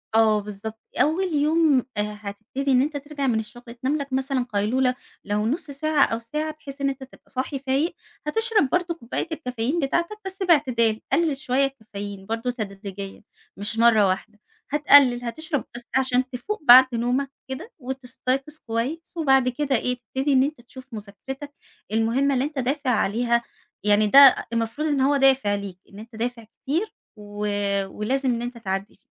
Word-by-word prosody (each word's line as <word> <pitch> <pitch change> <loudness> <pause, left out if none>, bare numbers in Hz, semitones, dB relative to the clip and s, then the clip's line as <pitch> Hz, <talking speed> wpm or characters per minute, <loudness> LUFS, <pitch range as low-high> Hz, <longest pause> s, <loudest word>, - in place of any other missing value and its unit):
آه 220 -1 +5
بالضبط 210 +2 -7 0.2
أول 340 +3 +1
يوم 305 0 +3 0.2
آآ 210 0 -2
هتبتدي 215 +7 -4
إن 250 - +5
أنت 290 +1 -1
ترجع 285 -1 -4
من 230 -3 +2
الشغل 240 +3 -9 0.2
تنام 275 +4 +1
لك 280 -2 -6
مثلًا 265 -1 0
قيلولة، 250 +5 +1 0.3
لو 210 +1 -1
نص 300 +2 -2
ساعة 300 +1 +2
أو 225 - -2
ساعة 300 +7 -3
بحيث 280 -2 -11
إن 275 - +2
أنت 270 0 -5
تبقى 265 - -17
صاحي 265 +1 -3
فايق، 275 +5 0 0.3
هتشرب 440 - +2
برضه 355 +1 0
كوباية 240 +2 -4
الكافيين 255 -1 -2
بتاعتك 340 +8 -1
بس 385 0 -4
باعتدال، 250 - +3
قلل 320 -5 +2
شوية 275 -1 +1
الكافيين 205 -7 -7
برضه 225 +3 -2
تدريجيًا، 200 -3 -7 0.4
مش 210 +3 -3
مرة 225 -3 +6
واحدة، 210 +3 -3 0.3
هتقلل 280 -4 +5
هتشرب 290 +2 -3
بس 240 - -7
عشان 255 -1 +2
تفوق 255 - -4
بعد 260 -1 +10
نومك 250 +4 0 0.2
كده، 310 - -6
وتستيقظ 265 +2 -3
كويس 250 +9 -3
وبعد 270 -5 +4
كده 275 +1 0
إيه 250 +1 0
تبتدي 265 +5 -1
إن 260 - +5
أنت 285 -3 -3
تشوف 255 +1 -13
مذاكرتك 250 +7 -8 0.4
المهمة 230 +6 +2
اللي 255 - +1
أنت 295 -2 -4
دافع 270 +1 -1
عليها، 235 +1 +1 0.4
يعني 210 +1 +4
ده 275 +4 +8
المفروض 230 +7 -1
إن 285 -3 +1
هو 280 +2 +3
دافع 265 -6 +4
ليك 200 -3 -7
إن 200 - -12
أنت 225 +1 -12
دافع 235 +1 -3
كتير 295 - -3 0.2
و 210 0 -6 0.4
ولازم 260 +7 -1
إن 235 -1 0
أنت 240 0 -5
تعدّي 195 -2 -4
255 Hz, 165 wpm, -24 LUFS, 225-285 Hz, 0.4 s, بعد